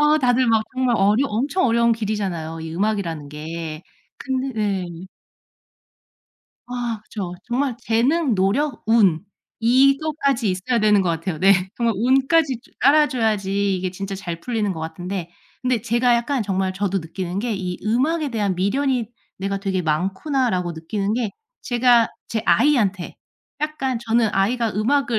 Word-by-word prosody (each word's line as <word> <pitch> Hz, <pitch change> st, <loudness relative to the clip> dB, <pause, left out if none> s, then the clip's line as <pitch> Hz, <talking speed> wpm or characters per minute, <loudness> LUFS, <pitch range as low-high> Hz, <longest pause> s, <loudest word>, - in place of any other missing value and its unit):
아 300 Hz, +1 st, +4 dB
다들 250 Hz, -1 st, +3 dB
막 220 Hz, -1 st, +3 dB
정말 255 Hz, -3 st, +1 dB
어려 210 Hz, +8 st, +3 dB
엄청 275 Hz, -, 0 dB
어려운 235 Hz, 0 st, +3 dB
길이잖아요, 195 Hz, -7 st, -3 dB
이 160 Hz, 0 st, -6 dB
음악이라는 175 Hz, -7 st, -2 dB
게. 155 Hz, +1 st, -6 dB, 0.4 s
근데 265 Hz, 0 st, -2 dB
네. 195 Hz, -4 st, 0 dB, 1.8 s
아 240 Hz, -3 st, -3 dB
그쵸. 195 Hz, -5 st, -6 dB
정말 250 Hz, 0 st, -1 dB
재능, 250 Hz, +5 st, +2 dB
노력, 230 Hz, +9 st, 0 dB
운 205 Hz, -6 st, +3 dB, 0.4 s
이것까지 275 Hz, 0 st, +2 dB
있어야 190 Hz, +7 st, -1 dB
되는 210 Hz, -2 st, +4 dB
것 180 Hz, -, 0 dB
같아요. 165 Hz, 0 st, -2 dB
네. 195 Hz, +1 st, +6 dB, 0.2 s
정말 235 Hz, -2 st, +1 dB
운까지 265 Hz, -, +2 dB
주 -, -, -23 dB
따라줘야지 215 Hz, -9 st, +2 dB
이게 185 Hz, 0 st, -3 dB
진짜 195 Hz, +1 st, -5 dB
잘 170 Hz, -3 st, -6 dB
풀리는 215 Hz, -4 st, -1 dB
것 160 Hz, -, -7 dB
같은데 175 Hz, +2 st, -5 dB, 0.3 s
근데 250 Hz, -4 st, 0 dB
제가 240 Hz, +1 st, +2 dB
약간 240 Hz, +2 st, 0 dB
정말 190 Hz, -2 st, -1 dB
저도 195 Hz, 0 st, -1 dB
느끼는 180 Hz, +2 st, -5 dB
게 235 Hz, 0 st, -2 dB
'이 180 Hz, -2 st, -4 dB
음악에 285 Hz, +8 st, +1 dB
대한 205 Hz, -4 st, 0 dB
미련이 245 Hz, +6 st, 0 dB, 0.3 s
내가 195 Hz, +1 st, -2 dB
되게 190 Hz, -2 st, -1 dB
많구나.'라고 185 Hz, -, 0 dB
느끼는 195 Hz, +6 st, -3 dB
게 235 Hz, -4 st, -1 dB, 0.3 s
제가 240 Hz, -1 st, +4 dB, 0.2 s
제 225 Hz, -, -1 dB
아이한테 220 Hz, -9 st, +2 dB, 0.4 s
약간 270 Hz, -5 st, -2 dB
저는 230 Hz, -1 st, +1 dB
'아이가 225 Hz, +3 st, +1 dB
음악을 240 Hz, +2 st, +1 dB
220 Hz, 305 characters per minute, -22 LUFS, 190-250 Hz, 1.8 s, 네